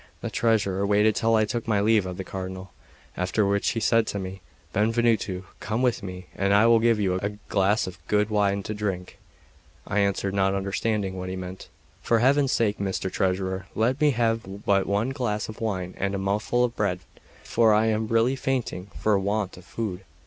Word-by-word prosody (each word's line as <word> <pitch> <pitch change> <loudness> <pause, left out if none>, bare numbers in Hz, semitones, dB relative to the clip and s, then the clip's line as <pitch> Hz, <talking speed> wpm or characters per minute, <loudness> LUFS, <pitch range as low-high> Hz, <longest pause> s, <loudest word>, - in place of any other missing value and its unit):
The - - -4
treasurer 100 -4 +1
waited 105 +1 +3
till 115 0 +2
I 110 -1 +3
took 115 +2 -4
my 105 -3 +2
leave 105 -2 +3
of 90 -1 -6
the 95 - -4
Cardinal; 95 0 -6 0.4
after 90 +4 0
which 100 0 +1
he 115 - -1
said 115 0 +3
to - - -3
me: 95 0 -6 0.3
"Benvenuto, 110 -3 +1 0.2
come 110 +4 -2
with 125 -4 +1
me, 90 -2 -7
and 100 +1 +2
I 105 +2 +5
will 115 0 +6
give 115 -1 +3
you 95 -2 +1
a 100 +2 -4
glass 100 +2 +2
of 95 - -8
good 105 +1 +1
wine 100 -1 +1
to 105 - -4
drink." 100 -4 -4 0.7
I 105 - 0
answered, 100 -1 0
not 95 0 +2
understanding 100 0 -1
what 90 0 -4
he 95 - -4
meant: 95 0 -7 0.3
"For 115 - +2
Heaven's 135 +3 +3
sake, 110 -6 +1
Mr. 95 -1 -2
Treasurer, 95 0 -1
let 125 +6 +1
me 150 - +5
have 115 -5 -1
but 100 -1 +2
one 105 +6 0
glass 120 -6 -2
of 110 - -9
wine 95 -5 -2
and 100 0 -1
a - - -1
mouthful 105 +5 0
of 120 -1 -1
bread; 90 -4 -1 0.4
for 115 -2 +3
I 105 +1 +4
am 110 0 0
really 115 +4 +2
fainting 130 -8 -2
for 105 -2 +2
want 100 0 -1
of 90 - -14
food. 100 -5 -4
105 Hz, 200 wpm, -25 LUFS, 95-115 Hz, 0.7 s, will